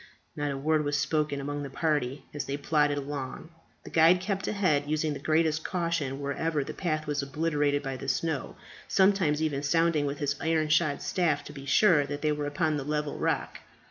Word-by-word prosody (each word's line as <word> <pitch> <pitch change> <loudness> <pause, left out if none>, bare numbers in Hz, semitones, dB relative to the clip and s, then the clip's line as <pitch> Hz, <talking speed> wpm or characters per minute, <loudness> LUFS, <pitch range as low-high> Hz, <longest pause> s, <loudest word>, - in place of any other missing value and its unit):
Not 145 0 -2
a 140 - -3
word 155 +2 +1
was 145 0 0
spoken 150 0 0
among 145 +1 -4
the 140 - -5
party 140 -2 -1
as 145 - -3
they 140 +1 -3
plodded 145 0 +1
along. 140 +2 -5 0.3
The - - -10
guide 165 +3 +6
kept 195 +1 -2
ahead, 155 -9 +1
using 155 0 0
the 140 - -6
greatest 155 +1 +1
caution 165 -6 -1
wherever 145 +2 -1
the - - -6
path 155 -4 -2
was 145 -1 -1
obliterated 145 0 0
by 135 -1 -4
the 135 - -7
snow, 140 +1 -1 0.3
sometimes 190 -6 +3
even 145 -3 -1
sounding 155 0 +2
with 140 +1 -3
his 145 0 -1
iron 160 -1 +1
shod 155 -2 +2
staff 160 -6 0
to 145 - -10
be 140 -1 -9
sure 150 -2 +4
that 145 +1 -5
they 155 - +2
were 150 -1 -2
upon 155 +1 0
the 140 - -3
level 150 0 -2
rock. - - -1
150 Hz, 200 wpm, -28 LUFS, 145-160 Hz, 0.3 s, guide